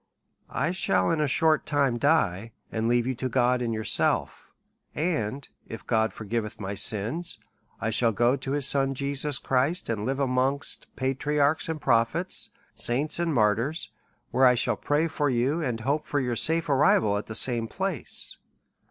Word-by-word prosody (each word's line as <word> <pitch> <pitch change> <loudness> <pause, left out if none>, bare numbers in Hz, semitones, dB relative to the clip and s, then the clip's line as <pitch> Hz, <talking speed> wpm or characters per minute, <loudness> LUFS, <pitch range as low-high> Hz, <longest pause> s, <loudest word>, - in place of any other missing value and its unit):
I 155 +7 -1
shall 185 -1 +1
in 160 -2 0
a 150 - +2
short 155 +3 +2
time 140 -5 +1
die, 115 - +1 0.2
and 110 0 -1
leave 120 0 +2
you 130 - -1
to 130 +1 -4
God 125 0 +2
and 120 -1 -1
yourself; 110 -1 0 0.5
and 140 -6 -2 0.2
if 115 - -9
God 110 -1 +1
forgiveth 110 0 -4
my 100 -1 -4
sins, 110 - 0 0.4
I 115 - -1
shall 115 +1 +3
go 120 +4 +2
to 135 0 -4
his 145 -2 +1
Son 135 0 +1
Jesus 140 +1 0
Christ, 135 +6 0
and 110 -3 -2
live 135 +4 -2
amongst 135 +1 0
patriarchs 145 +4 0
and 160 -1 -3
prophets, 130 +7 +1 0.2
saints 140 +8 -2
and 170 -1 0
martyrs, 115 +5 0 0.4
where 130 +2 +5
I 125 - +5
shall 120 - +1
pray 150 +3 0
for 150 -3 -1
you, 130 +6 0
and 120 -7 -2
hope 145 +6 -1
for 145 - 0
your 125 -3 -1
safe 165 +7 +1
arrival 130 -7 +3
at - - -9
the 110 - -6
same 115 0 +2
place. 190 -1 -4
130 Hz, 170 wpm, -26 LUFS, 115-150 Hz, 0.5 s, where